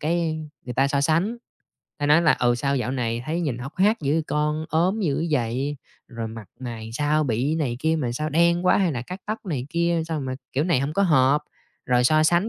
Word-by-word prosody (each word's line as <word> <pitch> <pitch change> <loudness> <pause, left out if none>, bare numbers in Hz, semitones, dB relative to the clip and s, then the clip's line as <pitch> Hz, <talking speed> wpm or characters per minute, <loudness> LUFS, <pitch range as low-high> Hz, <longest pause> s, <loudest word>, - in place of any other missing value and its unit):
cái 160 0 0 0.2
người 125 -1 -6
ta 135 +1 +3
so 140 -1 +1
sánh, 165 +7 +2
người 240 - -7 0.6
ta 145 - -1
nói 150 +3 +5
là, 155 -3 +5
ừ, 120 0 +2
"Sao 140 +3 0
dạo 125 0 -1
này 120 -2 -2
thấy 165 +3 -1
nhìn 135 -8 -2
hốc 135 +5 -8
hác 210 +5 +3
dữ 140 0 0
vậy 165 - +1
con, 150 +1 -1
ốm 180 +7 +1
dữ 165 -3 0
vậy, 135 +2 -1 0.3
rồi 115 -2 -5
mặt 110 -2 -9
mày 115 -3 -6
làm 110 - -9
sao 150 +3 +1
bị 130 +6 0
này 130 -7 -1
kia 160 +1 +2
mà 125 -6 -1
sao 155 +5 -2
đen 170 +3 +3
quá, - - +5
hay 180 -5 +2
là 120 -2 -3
cắt 180 +7 -8
tóc 215 0 -4
này 140 -7 -3
kia 170 -1 +1
sao 160 -3 -2
mà 130 -1 -3 0.2
kiểu 140 +3 +1
này 165 -7 +2
hổng 140 +2 -2
có 200 - +1
hợp." 145 -3 +4 0.4
Rồi 125 -1 +3
so 155 +4 +4
sánh, 175 +7 +3
150 Hz, 245 wpm, -24 LUFS, 130-165 Hz, 0.6 s, nói